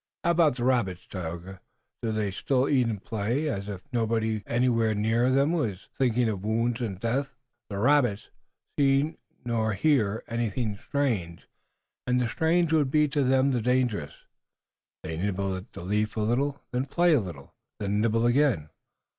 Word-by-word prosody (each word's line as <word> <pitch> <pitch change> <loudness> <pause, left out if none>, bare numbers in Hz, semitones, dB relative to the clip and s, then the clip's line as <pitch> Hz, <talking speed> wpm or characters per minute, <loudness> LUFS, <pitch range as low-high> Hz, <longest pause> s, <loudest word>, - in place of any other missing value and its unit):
How 170 - +3
about 165 -6 +3
the 120 - -4
rabbits, 120 -8 +1
Tayoga? 90 +1 -7 0.4
Do 115 - -1
they 105 -2 -1
still 130 +7 0
eat 130 -4 +3
and 105 -4 -4
play, 115 +8 -1
as 100 -7 -3
if 100 -3 -6
nobody 110 -2 0
anywhere 115 -2 +2
near 115 +4 +2
them 140 +4 +3
was 110 - -2
thinking 125 -2 +2
of 100 -4 -3
wounds 115 +3 0
and 100 -6 -3
death?" 135 +5 -1 0.3
"The 100 - -4
rabbits 125 -2 +2 0.5
neither 140 +1 +3
see - - -23 0.3
nor 110 -2 0
hear 110 -2 +1
anything 115 -2 -2
strange, 100 -9 -2 0.6
and 125 0 +2
the 125 - +1
strange 160 +5 +1
would 150 -4 +3
be 150 +2 +3
to 145 0 +1
them 130 +1 +3
the 125 -3 0
dangerous. 120 - 0 0.9
They 80 0 -4
nibble 95 +1 -1
at 95 +2 -9
the - - -9
leaves 105 +3 -1
a 110 - -1
little, 135 +6 0
then 125 +2 -1
play 175 +4 +3
a 145 - +5
little, 85 -8 -9 0.3
then 105 0 0
nibble 115 +1 +2
again." 120 - +2
115 Hz, 170 wpm, -27 LUFS, 105-135 Hz, 0.9 s, a